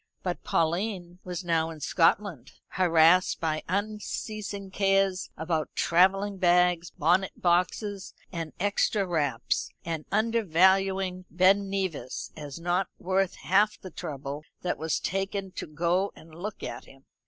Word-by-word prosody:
But 180 -2 -3
Pauline 175 +1 -1
was 180 0 -5
now 165 -2 +1
in 160 -1 -8
Scotland, 165 - +1 0.2
harassed 175 0 +4
by 155 -1 -1
unceasing 205 0 -3
cares 195 -1 +1
about 160 -1 -1
travelling 195 +3 +3
bags, 175 -1 +3
bonnet 175 +6 +1
boxes, 185 +3 0 0.2
and 165 -4 -4
extra 205 +1 +1
wraps, 145 -9 -1 0.2
and 165 -2 -3
under 225 +2 +2
valuing 190 +1 +2
Ben 195 +3 +3
Nevis 190 -9 -3
as 150 0 -7
not 175 +3 0
worth 190 +1 0
half 205 +3 +3
the 185 - -9
trouble 140 -1 -6 0.2
that 180 - -1
was 160 0 0
taken 195 0 -2
to - - -6
go 170 +5 0
and 160 0 -15
look 200 +6 -6
at - - -6
him. 135 0 -18
180 Hz, 130 wpm, -28 LUFS, 165-195 Hz, 0.2 s, harassed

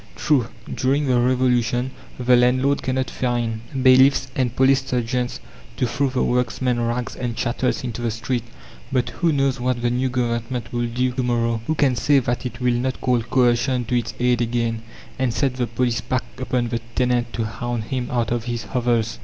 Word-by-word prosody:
True, 135 -6 +2 0.3
during 140 +3 +1
the 125 -2 +3
Revolution 125 0 +1 0.3
the 125 0 +4
landlord 130 +3 +3
cannot 130 0 -1
find 120 -3 -1 0.2
bailiffs 130 0 +5
and 125 -2 0
police 135 +1 +4
sergeants 125 -1 -2 0.4
to - - +1
throw 135 +3 0
the 130 0 0
workman's 125 0 0
rags 120 +1 -2
and 120 -2 -3
chattels 120 +3 -1
into 120 -1 -4
the 120 - 0
street, 115 +3 -2 0.5
but 125 -2 +1
who 170 -2 0
knows 135 -3 +1
what 125 -1 -1
the 120 - +2
new 130 +2 0
Government 120 0 -2
will 120 0 0
do 125 +2 0
to 125 +1 -2
morrow? 115 -2 0
Who 155 - +1
can 135 -4 +2
say 145 +4 +3
that 120 -1 0
it 120 0 -9
will 125 -1 +2
not 130 +2 -1
call 125 -2 +1
coercion 125 +1 +2
to 125 - -1
its 115 - -6
aid 125 -1 +2
again, 115 -1 -1 0.4
and 130 -2 +1
set 135 +2 0
the 125 -2 0
police 120 0 0
pack 125 +1 -1 0.2
upon 125 -2 -1
the 115 0 -1 0.2
tenant 125 -2 +1
to 115 - -1
hound 120 +1 -3
him 125 +2 -3
out 120 -3 -1
of 120 -1 -1
his 120 -1 -3
hovels? 120 -3 0
125 Hz, 190 wpm, -22 LUFS, 120-130 Hz, 0.5 s, bailiffs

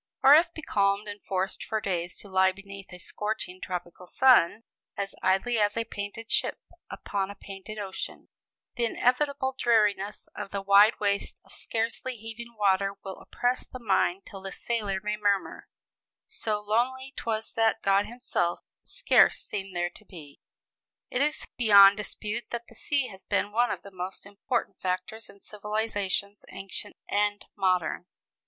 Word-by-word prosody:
'" - - -46
Or 275 - +9
if 330 +3 +6
becalmed, 205 -10 0
and 205 0 -6
forced 190 0 -2
for 220 - -1
days 175 -4 -2
to - - -8
lie 190 -1 +4
beneath 195 0 -11
a 180 - -8
scorching 185 0 -4
tropical 180 0 -6
sun, 230 -3 +5 0.3
"As 200 0 -2
idly 195 +5 +2
as 205 +1 +2
a 230 - +2
painted 225 +1 -7
ship - - +1 0.3
Upon 195 -1 -3
a 200 - -7
painted 195 +2 -9
ocean," 195 -2 -6 0.5
the 240 -2 +1
inevitable 265 +3 +1
dreariness 210 -4 +2
of 195 - -5
the 200 0 -4
wide 200 +3 +6
waste 200 -1 -1
of - - -19
scarcely 230 +3 -3
heaving 230 +1 -9
water 195 -1 +2
will 190 -1 -7
oppress 245 +1 -1
the - - -8
mind 195 -4 +1
till 195 -3 -10
the 195 0 -6
sailor 210 -5 -2
may 210 0 -1
murmur: 205 -2 0 0.6
"So 215 -2 -2
lonely 255 +5 0
'twas 220 -1 -3
that 225 0 +2
God 200 +1 +3
himself 235 -8 -1 0.2
Scarce - - +4
seemed 195 -2 -5
there 175 0 0
to 215 - -15
be." 155 -8 -13 0.7
It 250 - 0
is 300 +1 0
beyond 200 -4 +8
dispute 210 +2 -4
that 235 0 -4
the 235 - -17
sea 275 +2 0
has 190 -1 -12
been 205 - 0
one 240 +3 +2
of - - -4
the 200 - -11
most 185 +1 -6
important 205 +5 -3
factors 185 +5 -3
in 200 - -16
civilizations 205 -1 -2
ancient 195 +1 -7
and 205 0 0
modern. 180 -3 0
205 Hz, 160 wpm, -28 LUFS, 195-230 Hz, 0.7 s, Or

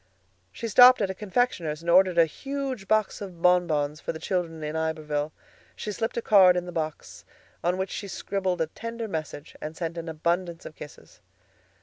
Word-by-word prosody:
She 230 - -5
stopped 250 +4 +8
at 190 - 0
a - - -5
confectioner's 190 -7 -1
and 170 - -3
ordered 185 0 +5
a 165 - +7
huge 270 - -5
box 215 0 +1
of 185 -4 -8
bonbons 155 -4 +2
for - - -3
the 160 - -7
children 165 -2 -3
in 150 +1 -4
Iberville. 155 -2 -2 0.4
She 210 - -5
slipped 225 +3 -3
a 235 - -1
card 185 -4 +6
in 180 - -2
the 175 - -7
box, 155 -2 -5 0.4
on 180 +1 +1
which 190 0 -3
she 200 - -5
scribbled 190 -2 -2
a - - +3
tender 230 +7 -6
message 155 -5 -6
and 155 +1 -6
sent 170 -1 -4
an 165 0 -6
abundance 170 +2 -2
of - - -8
kisses. 150 - -13
180 Hz, 190 wpm, -26 LUFS, 160-200 Hz, 0.4 s, stopped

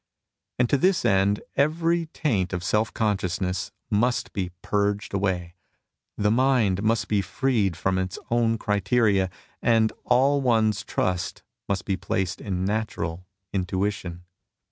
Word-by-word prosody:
And 125 - +3
to 140 - +3
this 185 -3 +2
end 100 -1 +2
every 165 +3 +1
taint 110 - -1
of 90 -1 -2
self 105 +4 +1
consciousness 95 -4 -1 0.2
must 120 +4 +1
be 95 -4 -2
purged 105 0 0
away, 95 -3 -1 0.6
the 105 0 +2
mind^^must 115 -4 +2
be 105 -2 +2
freed 100 -3 0
from 95 +2 0
its 95 0 -3
own 115 -1 +2
criteria, 105 -2 +2 0.3
and 115 -2 +3
all 135 +3 +3
one's 110 -5 +2
trust 90 -1 -2 0.3
must 100 -1 -1
be 95 -2 0
placed 95 -2 -2
in 95 -2 -2
natural 90 -5 -3 0.3
intuition. 95 -2 -2
105 Hz, 125 wpm, -25 LUFS, 95-115 Hz, 0.6 s, And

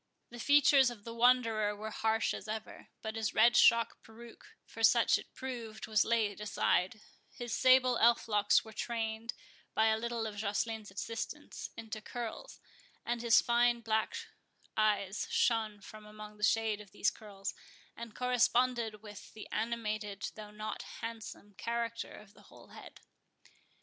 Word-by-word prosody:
The 240 - -9
features 280 -1 +5
of 230 -4 -10
the 230 - -7
Wanderer 230 -3 +3
were 215 +1 -6
harsh 220 +1 0
as - - -7
ever, 220 0 -6 0.2
but 220 0 -4
his 220 -2 -2
red 240 0 +6
shock 230 -1 +5
peruke, 230 +1 -14 0.2
for 225 - -10
such 225 +1 +5
it - - -13
proved, 235 -4 -6
was 215 -2 +3
laid 215 -3 0
aside, 210 0 0 0.3
his 240 -2 -6
sable 255 -1 +5
elf 235 0 +4
locks 205 -1 +3
were 220 - -11
trained, 225 0 -3 0.4
by 220 0 +4
a 220 0 +1
little 235 -1 -2
of 210 -2 -6
Joceline's 215 +1 -2
assistance, 230 +9 -6
into 220 -1 -6
curls, 235 0 -7 0.5
and 235 0 -2
his 235 -2 +5
fine 240 0 +2
black 220 - 0 0.6
eyes 205 -2 +1
shone 220 -3 +1
from 215 +2 -12
among 210 0 -11
the 210 - -9
shade 220 -1 +2
of 205 - -14
these 210 - +1
curls, 200 -2 -7 0.4
and 230 -2 -9
corresponded 245 -3 +1
with 210 -1 -11
the 215 - -9
animated, 215 -3 -3
though 215 -1 -9
not 215 +1 -6 0.2
handsome, 225 -2 -7
character 235 0 -3
of 205 -1 -15
the - - -18
whole - - -16
head. - - -13
225 Hz, 155 wpm, -33 LUFS, 210-235 Hz, 0.6 s, red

